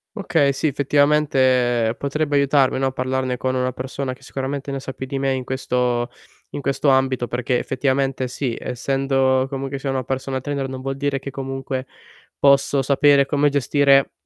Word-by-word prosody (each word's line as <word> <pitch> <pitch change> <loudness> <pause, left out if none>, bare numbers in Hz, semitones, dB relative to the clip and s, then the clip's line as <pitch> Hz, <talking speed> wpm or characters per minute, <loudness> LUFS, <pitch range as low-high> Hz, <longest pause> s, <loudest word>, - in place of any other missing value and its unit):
Okay, 160 -9 +2
sì, 140 - -3
effettivamente 130 -5 +2
potrebbe 145 +1 0
aiutarmi, 135 -2 +3
no, 135 0 +1
parlarne 130 -1 -2
con 130 +1 -1
una 130 0 0
persona 130 +1 -4
che 130 - -18
sicuramente 140 +1 -4
ne 135 - -3
sa 135 - -6
più 130 - -6
di 135 +1 -4
me 135 0 0
in 130 -1 -3
questo 125 -2 -1 0.4
in - - -5
questo 140 +2 -1
ambito 130 -2 +2
perché 125 +1 -1
effettivamente 135 -1 -1
sì, 125 -2 -3
essendo 135 +1 +1
comunque 135 0 -4
sia 135 0 -4
una 130 -1 -1
personal 130 +1 -3
trainer 140 -1 -3
non 130 0 -6
vuol 135 0 -3
dire 140 0 -1
che 140 - -7
comunque 135 -1 -4 0.5
posso 140 0 +4
sapere 140 +1 +4
come 145 0 +2
gestire 140 0 +3
135 Hz, 170 wpm, -21 LUFS, 130-140 Hz, 0.5 s, posso